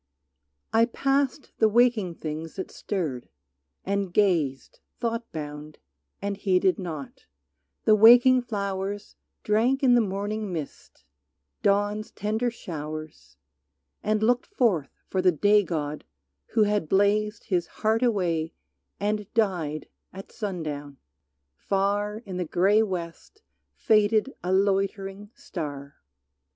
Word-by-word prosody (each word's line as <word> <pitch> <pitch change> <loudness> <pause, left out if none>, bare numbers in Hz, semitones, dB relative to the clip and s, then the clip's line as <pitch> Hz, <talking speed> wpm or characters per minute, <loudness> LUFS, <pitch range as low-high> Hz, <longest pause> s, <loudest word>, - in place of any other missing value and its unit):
I 225 +1 +5
passed 275 +3 -1
the 220 - +5
waking 220 -6 +3
things 155 +1 -6
that 190 - -5
stirred 160 - -4 0.6
and 200 -1 -1
gazed, 165 -10 +1 0.2
Thought 230 -1 -3
bound, 150 -1 -7 0.5
and 200 0 -2
heeded 185 -3 +2
not; 245 - -7 0.6
the 215 - +6
waking 245 +4 +7
flowers 200 -3 -4 0.3
Drank 235 +6 +2
in 250 -2 +6
the 240 - +5
morning 205 +1 -3
mist, 155 -5 -7 0.6
dawn's 205 +2 +1
tender 220 +4 -1
showers, 155 - -8 0.6
And 215 0 0
looked 245 +2 +2
forth 215 - +1 0.2
for 190 - 0
the 185 0 +5
Day 205 +6 +4
god 150 -5 -4 0.4
who 220 - +2
had 205 -6 0
blazed 205 +2 +2
His 175 -3 +1
heart 220 +1 0
away 175 -9 0 0.5
and 210 0 -2
died 175 -9 0 0.2
at 195 +1 -10
sundown. 150 -8 -5 0.6
Far 205 - -1
In 185 -3 -6
the 180 - -1
gray 195 +6 +3
west 185 - -5 0.3
faded 215 +3 +2
a 180 - -1
loitering 195 +1 0
star. 145 - -7
200 Hz, 115 wpm, -26 LUFS, 170-220 Hz, 0.6 s, waking